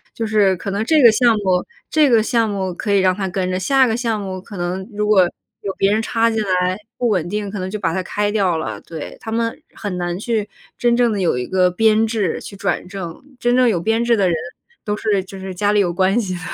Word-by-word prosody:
就 230 - -2
是 210 -3 +3
可 195 - -5
能 200 +2 -1
这 310 +7 +3
个 235 - +9
项 240 +2 +4
目 185 -2 +2 0.3
这 305 -2 +4
个 230 -3 +4
项 230 -1 +1
目 190 -3 -2
可 205 +4 -3
以 200 - +4
让 185 -1 +3
他 195 -1 -2
跟 185 -1 -2
着， 185 - -1
下 265 +7 +4
个 225 -3 0
项 230 -3 -1
目 190 -2 -5
可 195 +1 -10
能 180 +2 -3
如 210 0 -2
果 210 -3 +5 0.4
有 200 - -3
别 195 - +3
人 215 +1 +2
插 230 0 +1
进 225 -1 0
来， 185 -2 +1 0.2
不 245 - 0
稳 180 -5 0
定， 205 0 -3
可 205 - -5
能 185 0 -3
就 215 - -4
把 165 -5 -1
他 190 - -1
开 205 +3 -1
掉 190 -6 +1
了， 160 - -4
对。 160 -3 -8
他 220 - -6
们 230 0 -2
很 205 -4 -4
难 175 0 -2
去 215 0 -2 0.3
真 240 -1 +2
正 240 -1 +3
地 205 - -2
有 170 -8 +1
一 125 - -2
个 185 +2 +2
编 220 +4 +3
制 215 -6 -1
去 200 - -9
转 195 -2 -2
正。 180 -3 -7 0.2
真 240 0 +2
正 250 -1 +4
有 190 -6 +1
编 225 +6 +1
制 235 0 +3
的 195 -2 +3
人， 170 - +1 0.5
都 210 -2 -1
是 205 -4 0
就 190 +1 -10
是 190 0 -6
家 205 +3 +1
里 210 - +3
有 185 -4 +2
关 190 +5 +2
系 195 -5 -2
的。 - - -6
200 Hz, 280 characters per minute, -19 LUFS, 185-225 Hz, 0.5 s, 个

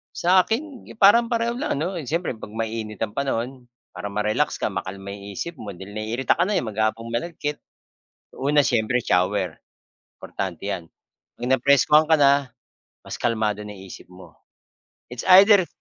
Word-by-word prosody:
Sa 185 +2 +4
akin 255 +7 -2
parang 230 +3 +6
pareho 235 -1 0
lang 305 - -1
ano, 170 +5 -3
yun 135 - -8
siyempre 165 +3 -1
'pag 110 -3 -9
mainit 110 -1 -4
ang 105 - -3
panahon, 130 -1 -3 0.2
para 105 - -6
ma-relax 105 +1 0
ka - - -2
makalma 95 +1 -6
yung 100 0 -9
isip 170 - -5
mo 100 -4 -7
dahil 95 +3 -10
naiirita 110 +8 -1
ka 180 - +3
na, 210 - 0
eh, 180 - +1
maghapong 110 +1 -2
malagkit. 150 +3 -3 0.7
Una 145 +1 +2
siyempre 120 0 +1
shower, 90 -1 0 0.5
importante 95 +1 -5
'yan. 85 -2 -4 0.5
'Pag 120 - -6
napreskuhan 140 +4 +4
ka 160 - +4
na, 140 -4 +3 0.5
mas - - -7
kalmado 110 -3 -1
na 105 - -8
isip 95 -1 -11
mo. 95 - -15 0.7
It's 125 - -6 0.2
either 200 -4 +4
120 Hz, 160 wpm, -23 LUFS, 105-160 Hz, 0.7 s, parang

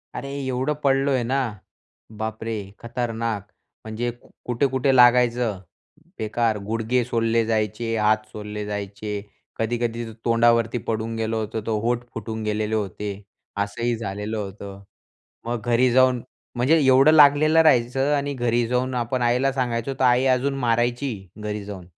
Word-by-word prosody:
अरे 140 - -5 0.2
एवढं 130 +3 -1
पडलोय 135 -1 +2
ना, 130 +4 0 0.8
बाप 110 0 -4
रे! 115 -1 -3 0.2
खतरनाक. 115 -3 -3 0.4
म्हणजे 115 +2 -3 0.4
कुठे-कुठे 130 +2 +1
लागायचं 120 -4 +4 0.6
बेकार, 110 0 0
गुडघे 115 +3 0
सोलले 115 -1 +1
जायचे, 110 +1 -1
हात 110 0 +2
सोलले 105 0 -6
जायचे, 105 0 -5 0.5
कधी-कधी 120 +1 -1 0.2
तोंडावरती 115 0 +3
पडून 115 0 -2
गेलं 110 0 -2
होतं 110 0 -3
तर - - 0
होठ 120 0 0
फुटून 110 0 -5
गेलेले 105 +1 -1
होते. 105 0 -3 0.5
असंही 115 +4 -1
झालेलं 105 0 -4
होतं. 100 -1 -7 0.6
मग 120 -1 -2
घरी 120 +1 +3
जाऊन 130 -1 +4 0.3
म्हणजे 140 +7 +3
एवढं 135 +3 +6
लागलेलं 155 +1 +6
राहायचं 135 0 +3
आणि 140 0 -2
घरी 120 -2 +1
जाऊन 125 +1 0
आपण 120 +1 -1
आईला 125 +3 +2
सांगायचं 125 0 -1
तर - - +1
आई 125 +2 +4
अजून 135 +2 -1
मारायची 120 +2 0 0.3
घरी 105 -1 -3
जाऊन. 95 -4 -8
115 Hz, 135 wpm, -23 LUFS, 110-125 Hz, 0.8 s, एवढं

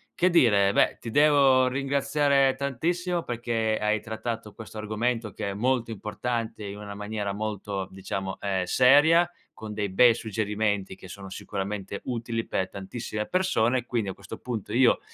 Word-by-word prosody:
Che 180 - +3
dire? 105 - +4
Beh, - - +3
ti 115 - -5
devo 135 -1 +5
ringraziare 140 0 +2
tantissimo 170 +6 -1
perché 115 -2 -1
hai 105 0 +1
trattato 110 -1 -5
questo 110 -1 -10
argomento, 110 +1 -2
che 100 -2 -4
è - - -4
molto 120 +1 0
importante, 110 +1 -4
in 100 +1 -6
una 105 -1 -7
maniera 105 -1 -3
molto, 100 -2 -4
diciamo, 95 0 -5
ehm, 95 -2 -1
seria, 145 - +5 0.3
con 110 -1 -7
dei 105 -1 -2
bei 115 +5 +6
suggerimenti 105 -3 -2
che 95 - -13
sono 95 +1 -9
sicuramente 100 +1 -5
utili 115 -2 -3
per 95 - -1
tantissime 105 +2 -5
persone. 130 -10 +1
Quindi, 110 -5 -1
a - - -4
questo 100 -2 -10
punto, 115 -5 -5
io 125 +1 +4
110 Hz, 155 wpm, -26 LUFS, 100-130 Hz, 0.3 s, bei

